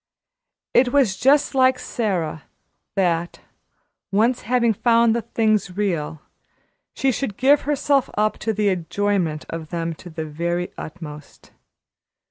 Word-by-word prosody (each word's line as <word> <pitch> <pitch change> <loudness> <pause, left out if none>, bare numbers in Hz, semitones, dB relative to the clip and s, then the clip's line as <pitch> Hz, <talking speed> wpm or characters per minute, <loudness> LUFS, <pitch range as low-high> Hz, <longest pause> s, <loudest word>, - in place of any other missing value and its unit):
It 245 0 +4
was 255 -9 +3
just 285 +6 +3
like 260 -1 +4
Sara, 180 - -3 0.5
that, 175 -3 0 0.7
once 225 +5 +2
having 235 0 +2
found 230 +1 +3
the 235 - 0
things 215 -4 0
real, 165 -7 -2 0.7
she 270 - +2
should 250 -5 -3
give 275 +3 +4
herself 285 -2 +2
up 215 0 +1
to 225 - -1
the 210 -1 +1
enjoyment 185 -3 -1
of 165 -2 -6
them 165 -1 -3
to 180 - -10
the 160 -1 -5
very 170 +3 -3
utmost. 150 -3 -10
205 Hz, 125 wpm, -22 LUFS, 170-240 Hz, 0.7 s, It